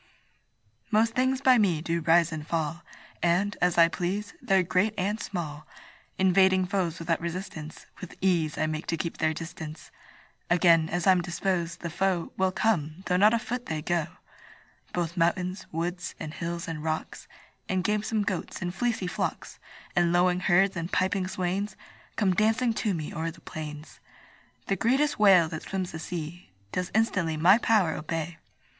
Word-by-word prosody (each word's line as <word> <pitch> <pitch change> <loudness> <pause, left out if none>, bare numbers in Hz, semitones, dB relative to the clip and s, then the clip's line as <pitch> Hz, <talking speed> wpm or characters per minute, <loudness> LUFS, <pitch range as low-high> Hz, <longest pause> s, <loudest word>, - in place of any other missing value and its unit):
Most 225 +2 +3
things 260 +1 +1
by 255 -3 +6
me 180 -7 +2
do 170 +1 -1
rise 165 +1 +4
and 155 -1 -6
fall, 165 0 -2 0.4
And, 180 +4 +2
as 180 -1 +2
I 165 -1 +8
please, 190 +4 -3
they're 190 -1 +3
great 185 +5 +1
and 205 +4 -1
small; 155 -8 -5 0.5
Invading 190 0 +4
foes 180 -3 -1
without 165 -1 -1
resistance, 170 -3 -6
With 185 - -9
ease 170 -5 +1
I 155 - +1
make 155 +1 -4
to 165 - -1
keep 165 +1 -4
their 155 - +2
distance: 160 -1 -8 0.6
Again, 165 -2 +4
as 175 0 -1
I'm 185 -2 +5
disposed, 170 -1 -2
the 170 - -4
foe 180 -1 -1
Will 190 0 +1
come, 180 -5 0
though 180 0 +1
not 210 +5 +5
a - - +3
foot 245 +2 -4
they 155 -1 -3
go. 170 -2 0 0.8
Both 175 0 -2
mountains, 180 +2 0
woods, 175 +2 -3
and 155 - -6
hills, 170 0 -4
and 155 -2 -5
rocks 160 0 -4 0.4
And 185 -1 0
gamesome 210 +1 0
goats, 190 -3 -3
and 175 -1 -3
fleecy 235 -3 -1
flocks, 180 - -4 0.4
And 175 -1 +3
lowing 180 +1 +3
herds, 190 +1 +3
and 170 +1 -4
piping 185 0 +1
swains, 190 +2 -2 0.4
Come 195 -4 +2
dancing 225 +4 +2
to 210 -3 -1
me 155 -2 -5
o'er 160 +1 -2
the - - -12
plains. 150 -1 -8 0.7
The 195 - 0
greatest 265 +8 +1
whale 190 -5 +6
that 160 - -5
swims 190 -2 -4
the 160 - -6
sea 165 - -6 0.2
Does 180 -1 -2
instantly 185 -8 +1
my 185 +8 +6
power 215 -8 +3
obey. 160 +1 -4
180 Hz, 165 wpm, -27 LUFS, 165-195 Hz, 0.8 s, I